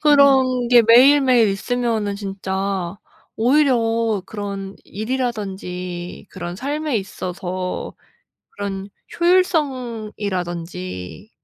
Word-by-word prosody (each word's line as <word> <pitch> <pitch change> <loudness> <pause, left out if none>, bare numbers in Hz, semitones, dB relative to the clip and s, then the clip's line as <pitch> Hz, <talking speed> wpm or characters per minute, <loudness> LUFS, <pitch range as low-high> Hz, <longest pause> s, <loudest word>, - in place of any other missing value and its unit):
그런 265 -4 +4
게 240 -1 +7
매일매일 250 0 +6
있으면은 220 0 -1
진짜 195 -2 -3 0.4
오히려 230 -5 +2
그런 200 -2 -6
일이라든지 195 -7 -4
그런 175 0 -6
삶에 290 +3 -2
있어서 185 -2 -4 0.6
그런 195 -1 -5 0.3
효율성이라든지 210 - -1
215 Hz, 205 characters per minute, -21 LUFS, 190-255 Hz, 0.6 s, 게